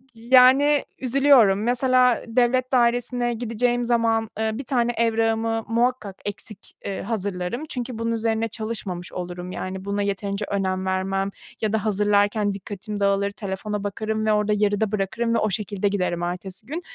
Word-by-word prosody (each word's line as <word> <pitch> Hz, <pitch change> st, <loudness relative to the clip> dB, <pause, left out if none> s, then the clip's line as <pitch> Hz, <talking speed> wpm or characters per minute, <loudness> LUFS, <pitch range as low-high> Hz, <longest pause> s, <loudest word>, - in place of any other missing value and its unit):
yani 260 Hz, +5 st, +5 dB
üzülüyorum. 255 Hz, -6 st, +4 dB
Mesela 250 Hz, 0 st, +3 dB
devlet 250 Hz, +2 st, +1 dB
dairesine 240 Hz, 0 st, +2 dB
gideceğim 240 Hz, +1 st, 0 dB
zaman, 230 Hz, -2 st, +1 dB
eee, 220 Hz, 0 st, +1 dB
1 265 Hz, +5 st, -5 dB
tane 240 Hz, -3 st, +1 dB
evrağımı 225 Hz, 0 st, +1 dB
muhakkak 235 Hz, -4 st, 0 dB
eksik, 205 Hz, 0 st, -8 dB
eee, 195 Hz, -, -3 dB
hazırlarım. 200 Hz, +4 st, -3 dB
Çünkü 245 Hz, -2 st, -5 dB
bunun 230 Hz, 0 st, -1 dB
üzerine 225 Hz, 0 st, 0 dB
çalışmamış 205 Hz, -6 st, -5 dB
olurum, 180 Hz, 0 st, -6 dB
yani, 190 Hz, +1 st, -5 dB
buna 200 Hz, 0 st, -1 dB
yeterince 200 Hz, +1 st, -2 dB
önem 190 Hz, -1 st, -1 dB
vermem 195 Hz, +1 st, -1 dB, 0.3 s
ya 215 Hz, -1 st, 0 dB
da 220 Hz, 0 st, 0 dB
hazırlarken 205 Hz, 0 st, +2 dB
dikkatim 205 Hz, +1 st, -6 dB
dağılır, 200 Hz, 0 st, +2 dB
telefona 205 Hz, 0 st, -4 dB
bakarım 215 Hz, +2 st, -2 dB
ve 215 Hz, -, +3 dB
orada 210 Hz, 0 st, +2 dB
yarıda 205 Hz, 0 st, +1 dB
bırakırım 210 Hz, +4 st, -1 dB
ve -, -, +3 dB
o 215 Hz, -, +1 dB
şekilde 205 Hz, 0 st, -1 dB
giderim 180 Hz, -3 st, -1 dB
ertesi 180 Hz, +3 st, -5 dB
gün. 325 Hz, +5 st, -4 dB
215 Hz, 150 wpm, -23 LUFS, 200-235 Hz, 0.3 s, yani